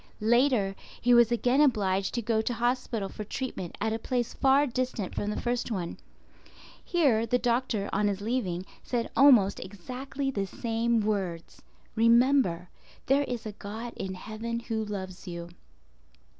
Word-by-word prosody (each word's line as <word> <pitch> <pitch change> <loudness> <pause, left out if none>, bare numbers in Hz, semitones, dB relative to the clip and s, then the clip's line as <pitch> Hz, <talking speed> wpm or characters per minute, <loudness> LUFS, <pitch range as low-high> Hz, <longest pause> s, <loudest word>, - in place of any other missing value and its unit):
Later, 235 -4 +3 0.2
he 245 0 +3
was 240 -1 +6
again 245 +4 +3
obliged 200 -8 +2
to 235 - -1
go 220 0 +1
to 240 +2 -2
hospital 240 -3 -1
for 210 - -7
treatment 210 -6 -5
at 220 +1 0
a 225 - -2
place 240 0 -2
far 275 +1 +4
distant 250 -6 -3
from 205 - -2
the 210 - -2
first 240 0 -1
one. 185 -6 -3 0.9
Here 265 -11 +2
the 245 - +3
doctor, 235 -4 0
on 205 +1 +2
his 200 -1 -1
leaving, 200 -5 -2 0.2
said 240 -2 -2
almost 240 -9 +6
exactly 255 +8 -5
the 200 -5 -2
same 230 +2 0
words—"Remember 210 +2 +1 0.4
there 280 +2 +3
is 245 -4 -5
a 215 - -4
God 220 +4 -7
in 190 -1 -4
heaven 225 +4 -5
Who 225 -2 -2
loves 190 -3 -6
you." 170 -1 -6
225 Hz, 150 wpm, -28 LUFS, 200-245 Hz, 0.9 s, was